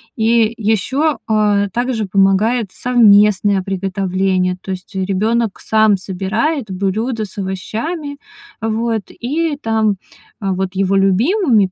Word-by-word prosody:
И 225 0 +2
ещё, 260 +8 0
э, 210 -2 +2
также 240 -2 -1
помогает 200 +4 +2
совместное 205 -5 +4
приготовление. 190 -1 -1
То 195 - -6
есть, 185 +1 -8
э, 190 - -1
ребёнок 215 +3 0
сам 215 -2 +3
собирает 215 - -2
блюдо 215 +5 -2
с 200 0 -10
овощами, 280 - -4 0.4
вот, 225 0 -1
и 300 +4 -2
там, 220 -5 0 0.4
вот 190 -1 -2
его 195 0 +1
любимыми- 220 - +3
210 Hz, 115 wpm, -17 LUFS, 195-235 Hz, 0.4 s, совместное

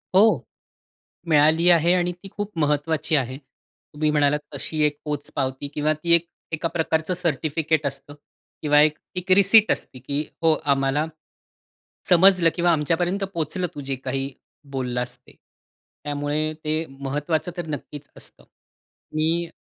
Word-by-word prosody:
हो, 215 +4 +5 0.8
मिळाली 160 +2 +4
आहे 170 0 +5
आणि 180 -1 +1
ती 180 +3 -12
खूप 205 0 -4
महत्वाची 150 +1 +1
आहे. 130 -2 -1
तुम्ही 150 +1 -6
म्हणालात, 150 -1 +2 0.2
तशी 155 +2 -3
एक 145 -1 -3
पोचपावती 145 -2 -3
किंवा 150 +1 +1
ती 170 +3 -1
एक 170 0 +3 0.3
एका 160 +1 -1
प्रकारचं 160 +1 -1
सर्टिफिकेट 160 -2 0
असतं 140 +1 -6 0.5
किंवा 150 -1 +5
एक, 150 0 +4 0.2
एक 180 +1 -5
रिसिप्ट 200 +3 +6
असते, 130 - -5
की 140 +4 -2 0.2
हो 165 -1 +5
आम्हाला 140 +1 +1 1.0
समजलं 180 -1 +6
किंवा 175 -1 +3
आमच्यापर्यंत 175 +5 0
पोहोचलं 170 +3 -1
तू 145 - -6
जे 135 -1 -3
काही 135 +1 -4 0.4
बोललास 125 -1 -3
ते. 125 - -20 0.7
त्यामुळे 145 +1 -1
ते 155 +1 0 0.2
महत्वाचं 150 +5 -2
तर 175 - -3
नक्कीच 145 -1 -7
असतं - - -12 0.7
मी 165 +2 0
155 Hz, 135 wpm, -23 LUFS, 145-170 Hz, 1.0 s, रिसिप्ट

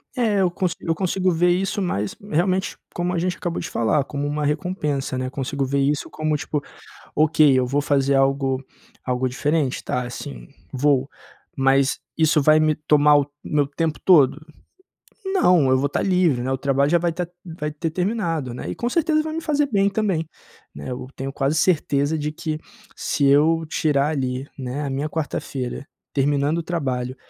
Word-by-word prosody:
É, 220 -5 +2
eu 180 - +2
consi 175 -1 -1
eu 165 - -1
consigo 185 +1 0
ver 175 +2 +2
isso, 195 +3 0
mas 105 - -2 0.2
realmente, 185 +4 0 0.2
como 175 +1 -1
a - - 0
gente 180 +1 -1
acabou 175 -1 -3
de - - -6
falar, 135 +5 +1
como 145 0 -4
uma 150 0 -2
recompensa, 150 -4 -1
né. 130 0 -2
Consigo 140 0 -2
ver 140 +1 -1
isso 145 +1 0
como 155 -1 -1
tipo: 150 -1 -3 0.5
"Ok, 155 -2 +4
eu 125 - +1
vou 140 +3 0
fazer 140 -1 +2
algo 135 -1 +1 0.4
algo 125 0 0
diferente? 145 +1 -1
Tá, 125 -1 -2
sim, 65 - -8 0.2
vou. 135 0 +2 0.5
Mas 135 0 +2 0.2
isso 160 -1 +3
vai 155 +2 +6
me 155 -1 +3
tomar 150 -1 +4
o 140 - 0 0.2
meu 145 -2 +1
tempo 155 +2 -2
todo?", 150 -5 +5 0.8
não, 180 - +4
vou 140 +2 +1
estar 145 - -1
livre, 180 -9 +2
né. 130 - -2
O 135 - 0
trabalho 140 +1 +1
já 175 - +4
vai 170 0 0
tá 175 0 -3 0.2
vai 160 -3 -5
ter 155 +2 -3
terminado, 170 - -1
né. 125 - -6
E - - -3
com 240 - -2
certeza 310 +1 +2
vai 315 0 -5
me 325 - -2
fazer 295 -2 +1
bem 200 -2 +3
também, 195 -6 -1 0.5
né. 70 - -7
Eu 125 0 -5
tenho 135 +1 -5
quase 140 +2 0
certeza 150 -2 +1
de 150 +1 -2
que, 155 0 -4 0.4
se 145 - -1
eu 155 +4 +4
tirar, 145 -2 +1
ali, 130 -2 -2
né, 130 +3 -4
a 140 - -3
minha 140 +3 -2
quarta-feira 140 -4 -4 0.3
terminando 145 +3 +1
o - - -2
trabalho, 130 -6 -2
150 Hz, 180 wpm, -22 LUFS, 135-170 Hz, 0.8 s, vai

